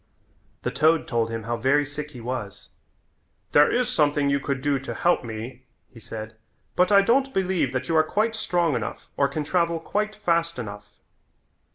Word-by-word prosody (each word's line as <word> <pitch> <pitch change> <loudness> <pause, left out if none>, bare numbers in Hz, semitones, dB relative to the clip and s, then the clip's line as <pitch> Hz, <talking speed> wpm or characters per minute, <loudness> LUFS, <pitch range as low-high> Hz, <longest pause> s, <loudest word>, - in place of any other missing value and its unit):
The - - -1
toad 155 +5 +3
told 115 -6 0
him 115 -1 -4
how 120 +1 -2
very 140 +5 +2
sick 150 +1 -6
he 125 -5 -11
was. 115 -5 -5 0.8
"There 145 0 +6
is 245 0 +1
something 145 - +2
you 140 - +2
could 140 -1 -2
do 145 -2 +1
to 135 - -6
help 175 -5 +2
me," 120 +3 -7 0.3
he 115 - -12
said, 110 0 -8 0.4
"but 180 +2 +3
I 200 -1 +7
don't 265 +5 +2
believe 185 -8 +1
that 130 -1 -2
you 165 - 0
are 155 - +6
quite 215 +7 0
strong 175 - 0
enough 115 -3 -5
or 140 - +3
can 150 +3 -3
travel 170 +1 +1
quite 210 +5 -2
fast 170 -6 0
enough." 105 -3 -7
145 Hz, 185 wpm, -25 LUFS, 125-175 Hz, 0.8 s, I